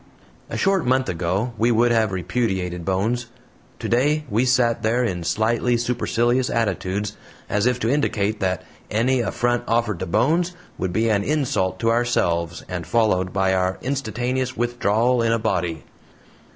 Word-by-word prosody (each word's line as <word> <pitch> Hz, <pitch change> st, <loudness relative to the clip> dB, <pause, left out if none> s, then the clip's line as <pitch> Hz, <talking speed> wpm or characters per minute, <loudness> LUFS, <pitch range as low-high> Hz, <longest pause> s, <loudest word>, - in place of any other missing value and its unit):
A -, -, -4 dB
short 195 Hz, -3 st, +2 dB
month 130 Hz, +1 st, +1 dB
ago 95 Hz, +7 st, -1 dB
we 115 Hz, +2 st, +3 dB
would 120 Hz, +1 st, +3 dB
have 110 Hz, -3 st, +2 dB
repudiated 95 Hz, -2 st, -2 dB
Bones; 110 Hz, +7 st, -1 dB, 0.5 s
today 150 Hz, +5 st, +1 dB
we 115 Hz, +5 st, +2 dB
sat 125 Hz, -2 st, +2 dB
there 120 Hz, +3 st, +1 dB
in 90 Hz, -7 st, -2 dB
slightly 115 Hz, +7 st, +1 dB
supercilious 120 Hz, +1 st, 0 dB
attitudes, 105 Hz, -2 st, -1 dB, 0.3 s
as 105 Hz, +3 st, +1 dB
if 125 Hz, 0 st, +1 dB
to -, -, 0 dB
indicate 110 Hz, -6 st, 0 dB
that 95 Hz, -2 st, -1 dB, 0.3 s
any 125 Hz, +4 st, +2 dB
affront 120 Hz, +1 st, 0 dB
offered 115 Hz, -5 st, 0 dB
to 95 Hz, -, -3 dB
Bones 165 Hz, -, +1 dB, 0.3 s
would 95 Hz, -, -1 dB
be 110 Hz, +5 st, +1 dB
an 100 Hz, -2 st, +2 dB
insult 135 Hz, -9 st, 0 dB
to 115 Hz, 0 st, +3 dB
ourselves, 85 Hz, -8 st, 0 dB
and 90 Hz, -3 st, -5 dB
followed 95 Hz, -3 st, +2 dB
by 95 Hz, -1 st, +1 dB
our 95 Hz, 0 st, 0 dB
instantaneous 130 Hz, -1 st, -2 dB
withdrawal 120 Hz, 0 st, +1 dB
in 115 Hz, 0 st, +2 dB
a 115 Hz, -, +3 dB
body. 85 Hz, -7 st, -1 dB
115 Hz, 150 wpm, -22 LUFS, 95-125 Hz, 0.5 s, we